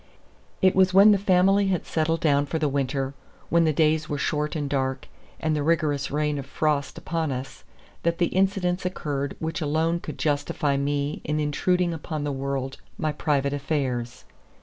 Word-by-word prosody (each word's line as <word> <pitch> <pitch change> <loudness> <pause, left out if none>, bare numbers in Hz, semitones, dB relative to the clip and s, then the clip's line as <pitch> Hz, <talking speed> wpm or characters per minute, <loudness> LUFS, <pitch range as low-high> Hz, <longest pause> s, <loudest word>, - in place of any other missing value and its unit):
It 185 - +5
was 185 -1 +4
when 200 +2 +8
the 200 - +4
family 195 +1 +3
had 185 -3 0
settled 165 +1 0
down 145 -2 +2
for 160 - -2
the 155 -2 +1
winter, 135 -1 -1 0.4
when 170 0 +4
the 155 - +3
days 155 +1 +2
were 145 - -1
short 150 +1 -1
and 145 -2 -2
dark, 130 -1 -2 0.3
and 155 -1 0
the 150 - 0
rigorous 145 -3 +1
reign 150 0 0
of 135 - -7
frost 145 -1 -1
upon 165 -3 -2
us, 130 +1 -6 0.4
that 170 0 0
the 175 -1 +2
incidents 190 -1 +1
occurred 145 -6 -3
which 160 +2 -3
alone 160 +3 +1
could 155 - -7
justify 145 0 0
me 140 +1 -1
in 150 0 -1
intruding 175 +4 +1
upon 155 -1 -4
the 145 - -1
world 135 -1 -3 0.2
my 155 - 0
private 140 -1 0
affairs. 130 -4 -2
150 Hz, 175 wpm, -25 LUFS, 140-170 Hz, 0.4 s, when